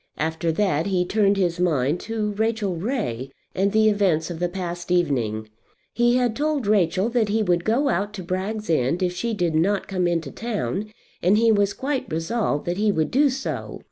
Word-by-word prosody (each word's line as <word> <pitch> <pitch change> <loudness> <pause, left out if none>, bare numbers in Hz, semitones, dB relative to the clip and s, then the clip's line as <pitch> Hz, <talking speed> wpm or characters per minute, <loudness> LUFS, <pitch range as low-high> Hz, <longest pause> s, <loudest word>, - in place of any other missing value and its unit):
After 160 +2 -1
that 175 -3 +1
he 185 -2 +1
turned 200 +1 +2
his 175 -3 0
mind 155 -3 +1
to 215 -2 -2
Rachel 215 -2 -1
Ray 165 - -3 0.2
and 195 +2 +1
the 220 +1 +4
events 185 -6 +2
of 165 - -6
the 175 0 0
past 175 -1 -5
evening. 125 -11 0 0.5
He 240 0 +3
had 245 -3 +1
told 295 -2 0
Rachel 195 -1 +2
that 235 -3 +1
he 220 +1 +1
would 175 -3 +1
go 240 +8 +2
out 205 -4 0
to 190 - -6
Bragg's 195 +5 -3
End 160 +3 +1
if 180 -1 0
she 230 +5 -2
did 175 -4 0
not 190 +5 +1
come 185 -2 0
into 165 -5 -1
town, 215 -2 -3 0.3
and 190 +4 +4
he 230 0 +4
was 205 -2 +2
quite 270 +1 -3
resolved 165 -1 -1
that 175 +1 -2
he 210 0 +2
would 160 -5 0
do 285 +2 +4
so. 270 +1 -4
195 Hz, 195 wpm, -23 LUFS, 170-220 Hz, 0.5 s, the